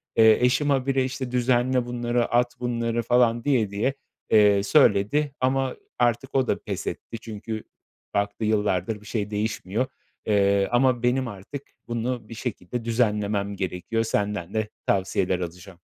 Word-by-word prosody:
Eee, 110 -1 +7
eşim 140 +4 +2
ha 135 -2 +2
bire, 135 -1 +2
işte, 130 -1 -4
"Düzenle 125 0 +2
bunları, 120 0 0
at 120 +1 +1
bunları." 120 -1 -1
falan 120 -1 +3
diye 125 -8 +2
diye, 110 +7 0 0.4
eee, 105 -2 +5
söyledi. 135 +4 +3
Ama 130 0 +1 0.2
artık 120 +3 +1
o 130 -2 +3
da - - 0
pes - - -4
etti 115 - -5
çünkü 110 0 -6 0.5
baktı, 100 +2 -1
yıllardır 105 -1 0
bir - - -16
şey 105 -1 -2
değişmiyor, 105 +2 -1 0.4
eee, 100 -2 +3
ama 120 -1 +3
benim 125 +1 +2
artık 105 +7 -7 0.3
bunu 120 -1 -3
bir - - -7
şekilde 115 0 -5
düzenlemem 105 -3 0
gerekiyor. 95 +4 -2
Senden 105 -4 -2
de 110 -1 0 0.2
tavsiyeler 95 -1 +1
alacağım. 90 +1 -7
115 Hz, 145 wpm, -25 LUFS, 100-125 Hz, 0.5 s, Eee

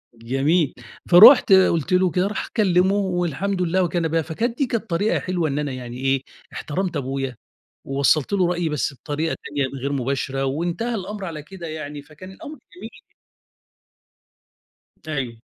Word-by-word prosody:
جميل، 135 +7 0 0.4
فرُحت 210 +7 +9
قُلت 185 -3 +3
له 180 -1 +3
كده، 185 +1 +1
راح 210 - -4
كلّمه 190 -2 +3
والحمد 185 -1 -1
لله 180 +2 +1
وكان 170 -1 0
بها، 165 +1 0
فكانت 225 - -3
دي 280 - +1
كانت 230 -2 -3
طريقة 190 +6 +1
حلوة 175 -4 -2
إن 140 - -2
أنا 145 -2 -2
يعني 125 -1 -7
إيه، 135 0 0 0.3
احترمت 175 +2 -3
أبويا، 135 -1 -3 0.5
ووصلت 140 +5 +1
له 185 -3 +2
رأيي 175 -2 -1
بس 150 -1 -2
بطريقة 150 +4 -3
تانية 140 -2 -1
غير 140 - -2
مباشرة، 135 +1 -2
وانتهى 175 - -2
الأمر 200 0 -5
على 155 -4 -6
كده 175 +1 -9
يعني، 150 -2 -6
فكان 155 +6 -13
الأمر 305 +8 -10 0.2
جميل. - - -8 2.2
أيوه. 130 -7 -4
165 Hz, 150 wpm, -22 LUFS, 140-190 Hz, 2.2 s, فرُحت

